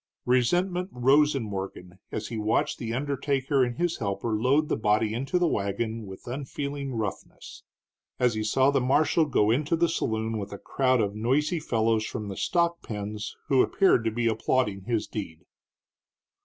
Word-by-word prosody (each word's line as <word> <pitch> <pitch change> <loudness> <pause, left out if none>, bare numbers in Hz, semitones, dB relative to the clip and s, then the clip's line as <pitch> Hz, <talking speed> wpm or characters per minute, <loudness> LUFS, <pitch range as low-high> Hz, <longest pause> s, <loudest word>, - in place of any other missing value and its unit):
Resentment 175 +9 +1
rose 140 +4 +4
in 135 - -1
Morgan 95 -3 -6
as 105 - -4
he 115 - -4
watched 110 +1 0
the 115 -1 -4
undertaker 135 +1 0
and 120 -1 -2
his 175 -1 0
helper 100 +2 -2
load 130 +8 +2
the - - 0
body 110 0 +1
into 135 +9 -1
the 175 -1 +2
wagon 110 -1 -2
with 95 0 -10
unfeeling 140 +1 -4
roughness; 105 -3 -6 0.6
as 125 -2 +3
he 110 0 -2
saw 130 +6 +3
the 135 -2 +2
marshal 155 +5 +3
go 110 -6 +3
into 150 +7 +1
a 170 +1 +2
saloon 110 -8 -1
with 100 0 -6
a 100 - -6
crowd 130 +2 +1
of 100 -1 -1
noisy 140 - +1
fellows 115 -6 +1
from 105 -2 -5
the 95 - -5
stock 170 - 0
pens 105 0 -5
who 135 -2 +4
appeared 190 - +3
to 115 - +1
be 115 +2 -2
applauding 110 -3 0
his 115 -2 0
deed. 90 -7 -7
120 Hz, 170 wpm, -27 LUFS, 110-140 Hz, 0.6 s, rose